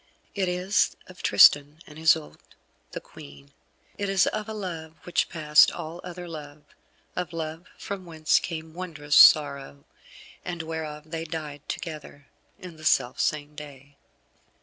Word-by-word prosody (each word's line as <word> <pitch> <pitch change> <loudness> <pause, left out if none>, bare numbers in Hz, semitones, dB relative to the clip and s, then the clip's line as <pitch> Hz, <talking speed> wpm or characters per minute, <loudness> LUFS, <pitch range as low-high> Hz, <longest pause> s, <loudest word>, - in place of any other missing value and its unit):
It 190 -3 -1
is 180 +3 +1
of 185 -1 -14
Tristan 145 +1 +6
and 150 0 -13
Isoude, 160 -1 +2 0.5
the - - -5
Queen. 70 0 -14 0.5
It 200 -1 -1
is 195 -2 +3
of 215 0 -3
a - - -4
love 165 -6 -6
which 175 - 0
passed 150 -3 +5
all 165 +2 -7
other 180 0 -8
love, 150 -2 -9 0.5
of 180 -1 -4
love 160 +1 -5
from 200 -2 -6
whence 160 -3 +1
came 160 -2 -6
wondrous 155 -5 -3
sorrow, 140 -2 +5 0.6
and 175 -2 -5
whereof 155 -1 -6
they 165 -1 -3
died 155 -3 -6
together 150 -3 -7 0.3
in 175 -3 -11
the 155 - -14
self 130 -4 +2
same 150 -1 -1
day. 140 -1 -12
160 Hz, 145 wpm, -26 LUFS, 150-175 Hz, 0.6 s, Tristan